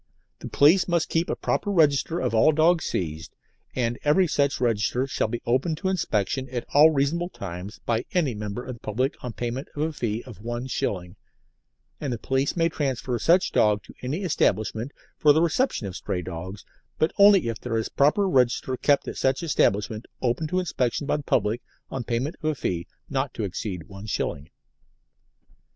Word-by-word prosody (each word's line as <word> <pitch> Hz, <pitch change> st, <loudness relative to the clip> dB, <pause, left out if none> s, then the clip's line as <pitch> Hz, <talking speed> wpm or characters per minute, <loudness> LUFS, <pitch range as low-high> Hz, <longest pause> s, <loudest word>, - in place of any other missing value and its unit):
The -, -, -7 dB
police 165 Hz, +7 st, +5 dB
must 170 Hz, -2 st, +1 dB
keep 165 Hz, +2 st, 0 dB
a -, -, 0 dB
proper 205 Hz, -, -1 dB
register 160 Hz, -2 st, +3 dB
of -, -, -1 dB
all 110 Hz, +7 st, +5 dB
dogs 160 Hz, +2 st, +3 dB
seized, 80 Hz, -2 st, -4 dB, 0.4 s
and 120 Hz, -1 st, -1 dB
every 150 Hz, +6 st, +4 dB
such 140 Hz, -4 st, +1 dB
register 120 Hz, +1 st, +1 dB
shall 135 Hz, -, -1 dB
be 115 Hz, +2 st, -5 dB
open 130 Hz, +7 st, +1 dB
to 190 Hz, +4 st, -2 dB
inspection 130 Hz, -, -1 dB
at 120 Hz, -2 st, -4 dB
all 150 Hz, +2 st, +8 dB
reasonable 160 Hz, +4 st, 0 dB
times 95 Hz, -, -7 dB
by 115 Hz, 0 st, 0 dB
any 160 Hz, -9 st, +1 dB
member 105 Hz, +2 st, -5 dB
of 130 Hz, -, -5 dB
the 120 Hz, -, -12 dB
public 125 Hz, +7 st, -1 dB
on 125 Hz, -2 st, -4 dB
payment 120 Hz, +4 st, -4 dB
of 150 Hz, -, -1 dB
a 160 Hz, 0 st, -1 dB
fee 115 Hz, -4 st, -2 dB
of 115 Hz, -6 st, -11 dB
one 120 Hz, +2 st, -4 dB
shilling, 90 Hz, -7 st, -3 dB, 0.8 s
and 140 Hz, -, -3 dB
the 120 Hz, -, -2 dB
police 135 Hz, +7 st, -1 dB
may 165 Hz, -1 st, +3 dB
transfer 130 Hz, -6 st, -2 dB
such 180 Hz, +3 st, +3 dB
dog 105 Hz, -1 st, +3 dB
to -, -, -14 dB
any 145 Hz, +10 st, -3 dB
establishment 110 Hz, -, 0 dB, 0.3 s
for 150 Hz, -1 st, +6 dB
the 160 Hz, -, +3 dB
reception 170 Hz, -, +1 dB
of 95 Hz, -2 st, -6 dB
stray 90 Hz, -2 st, -3 dB
dogs, 95 Hz, +3 st, -7 dB, 0.3 s
but 155 Hz, -, +1 dB
only 200 Hz, -, +7 dB
if 115 Hz, -1 st, -3 dB
there 115 Hz, -2 st, -2 dB
is 110 Hz, -, -1 dB
a -, -, -17 dB
proper 150 Hz, +8 st, +3 dB
register 130 Hz, -4 st, +2 dB
kept 145 Hz, +2 st, +2 dB
at -, -, -5 dB
such 135 Hz, +4 st, +1 dB
establishment 110 Hz, -, +1 dB
open 130 Hz, +5 st, 0 dB
to 180 Hz, -, -1 dB
inspection 145 Hz, -6 st, -1 dB
by -, -, +1 dB
the -, -, -5 dB
public 115 Hz, -4 st, 0 dB, 0.3 s
on 130 Hz, -, -3 dB
payment 120 Hz, +7 st, -2 dB
of -, -, -7 dB
a 155 Hz, -, -1 dB
fee 85 Hz, -8 st, -3 dB, 0.2 s
not 135 Hz, -2 st, -3 dB
exceeding 95 Hz, -3 st, -4 dB
one 100 Hz, +1 st, -10 dB
shilling. 75 Hz, -6 st, -3 dB
130 Hz, 190 wpm, -25 LUFS, 110-155 Hz, 0.8 s, all